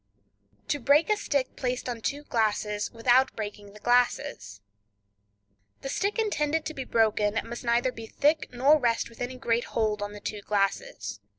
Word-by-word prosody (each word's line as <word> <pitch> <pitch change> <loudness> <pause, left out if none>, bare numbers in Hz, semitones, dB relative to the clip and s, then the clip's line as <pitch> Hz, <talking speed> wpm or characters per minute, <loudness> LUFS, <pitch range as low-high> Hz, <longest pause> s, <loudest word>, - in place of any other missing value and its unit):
To 290 - 0
Break 285 - +4
a - - +5
Stick 285 -10 -1
Placed 250 -1 -2
on 240 -2 -4
Two 290 +5 -2
Glasses 210 -4 0
Without 250 +3 +3
Breaking 205 -1 -6
the 210 - -13
Glasses.—The 100 - -3
stick 400 - -1
intended 320 -8 0
to 315 - -4
be 265 -3 -5
broken 215 -1 +2
must 235 +2 -7
neither 240 +2 +2
be 225 -2 -9
thick 300 +6 +1
nor 275 +5 +4
rest 235 -3 +1
with 230 - -14
any 250 +1 -3
great 240 -2 0
hold 215 -2 +1
on 205 0 -4
the 205 - -8
two 210 0 -5
glasses. 195 - -1
230 Hz, 165 wpm, -27 LUFS, 205-265 Hz, -, a